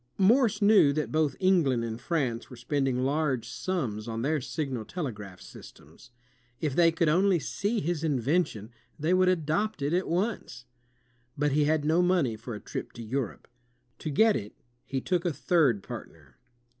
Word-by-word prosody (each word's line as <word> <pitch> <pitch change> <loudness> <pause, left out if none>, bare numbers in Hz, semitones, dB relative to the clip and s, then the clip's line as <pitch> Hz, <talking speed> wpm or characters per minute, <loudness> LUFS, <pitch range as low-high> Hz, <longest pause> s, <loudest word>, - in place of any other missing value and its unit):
Morse 220 +1 +3
knew 200 -8 +6
that 155 +1 -2
both 155 -3 +1
England 165 -11 +3
and 115 0 -5
France 130 -6 -2
were 125 - -10
spend 135 +3 -1
ing 125 -1 0
large 135 -4 0
sums 120 - -3
on 115 0 -3
their 150 +1 0
signal 135 -4 -3
telegraph 105 - -6
systems. - - -14 0.5
If 150 -4 -2
they 170 -1 +5
could 165 0 0
only 185 +4 +4
see 205 +7 -2
his 170 -2 -2
invention, 135 - 0 0.3
they 160 +4 +1
would 185 0 +4
adopt 180 +4 0
it 145 +3 0
at 185 +2 +1
once. 175 - -2 0.7
But 145 0 +1
he 150 +1 +3
had 155 0 +1
no 160 +3 +3
money 175 -10 +2
for 115 +1 -7
a - - -7
trip - - -6
to 115 - -8
Europe. 120 0 -4 0.5
To 155 - -4
get 220 +9 +4
it, 105 -1 -5 0.3
he 135 -1 -2
took 180 +2 0
a 175 - 0
third 140 - +2
partner. - - -10
150 Hz, 170 wpm, -28 LUFS, 125-180 Hz, 0.7 s, knew